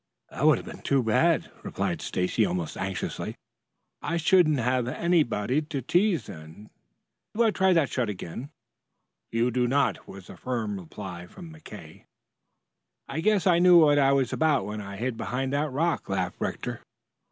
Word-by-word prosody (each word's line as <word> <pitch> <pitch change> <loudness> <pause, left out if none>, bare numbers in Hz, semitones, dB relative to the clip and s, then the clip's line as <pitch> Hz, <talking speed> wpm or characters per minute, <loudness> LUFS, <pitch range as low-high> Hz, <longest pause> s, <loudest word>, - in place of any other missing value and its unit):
"That - - -5
would - - +6
have - - -8
been - - -10
too 135 -2 +1
bad," 155 +9 +2
replied - - -3
Stacy 90 +5 0
almost 90 -6 -2
anxiously. 95 -1 -4 0.7
"I 170 - -2
shouldn't 165 -2 +4
have 125 0 0
had 125 - -3
anybody 150 -7 +1
to 145 -3 -5
tease 175 - +2
then. 80 +5 -12 0.6
Do 235 - +3
I 225 - +3
try 190 -2 +2
that 165 -5 +2
shot 125 -4 -1
again?" 100 +7 -6 0.8
"You 115 +2 +1
do 125 0 +1
not!" 130 -5 0
was 95 -1 -11
the - - -12
firm 110 -6 -3
reply 90 0 -8
from 165 - -12
McKay. 105 - -12 1.0
"I - - -4
guess 210 +1 +2
I 175 -3 +4
knew 180 0 +7
what 145 -3 +6
I 135 -1 +4
was 135 -3 +1
about 155 -4 +2
when 105 0 -5
I 100 0 -8
hid 120 +2 -3
behind 130 +6 -3
that 150 +2 0
rock," 160 +1 -1
laughed 95 -2 -2
Rector. - - -4
130 Hz, 170 wpm, -26 LUFS, 105-160 Hz, 1.0 s, knew